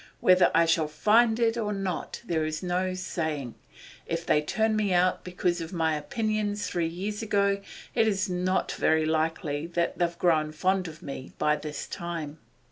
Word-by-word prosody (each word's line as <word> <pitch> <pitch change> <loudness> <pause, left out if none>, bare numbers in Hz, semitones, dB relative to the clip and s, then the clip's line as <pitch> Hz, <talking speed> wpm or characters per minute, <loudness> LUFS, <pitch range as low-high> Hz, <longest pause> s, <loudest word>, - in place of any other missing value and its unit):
Whether 185 0 +5
I 165 0 +5
shall 160 -1 +2
find 220 +9 +3
it 230 0 +2
or 210 -2 -1
not 195 +1 -4
there's 155 -3 -1
no 185 +1 0
saying. 155 -8 -3 0.5
If 165 0 -2
they 150 - +3
turned 220 +8 +1
me 205 -4 +1
out 180 +1 +2
because 180 -1 -1
of 165 +2 -6
my 160 -2 +1
opinions 210 +5 -1
three 170 -2 -1
years 195 +6 -4
ago, 200 -2 +1 0.3
it's 215 -4 +2
not 185 0 0
very 160 0 +2
likely 155 -1 -1
that 170 0 -1
they've 170 -1 0
grown 155 -3 +2
fonder 185 +2 0
of 155 - -13
me 135 -1 -7
by 150 0 +2
this 150 -1 -5
time. 160 -3 -5
175 Hz, 165 wpm, -27 LUFS, 160-200 Hz, 0.5 s, Whether